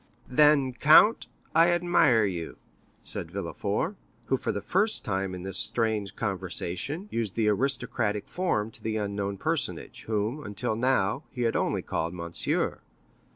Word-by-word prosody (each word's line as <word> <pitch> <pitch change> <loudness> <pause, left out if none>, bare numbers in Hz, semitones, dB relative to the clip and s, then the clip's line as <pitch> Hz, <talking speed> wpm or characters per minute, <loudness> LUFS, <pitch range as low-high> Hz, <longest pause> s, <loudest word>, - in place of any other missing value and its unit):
"Then, 140 -1 +4
count, 155 - +6 0.3
I 165 +2 +6
admire 175 -10 +4
you," 85 -4 -4 0.5
said - - -3
Villefort, - - -3 0.3
who, - - +3
for - - -2
the 100 - -3
first 205 -1 0
time 95 -3 -2
in 90 - -7
this 95 0 -2
strange 110 -3 0
conversation, 95 - -3
used 110 -5 -2
the 110 -2 +1
aristocratic 110 -3 -1
form 115 - -1
to - - -15
the 110 0 -2
unknown 100 -1 -2
personage, - - -3
whom, 110 +6 -2
until 105 +1 -1
now, 130 +4 +1
he 125 -2 -4
had 115 - +1
only - - 0
called 85 +2 -3
monsieur. 85 -1 0
110 Hz, 145 wpm, -27 LUFS, 100-140 Hz, 0.5 s, count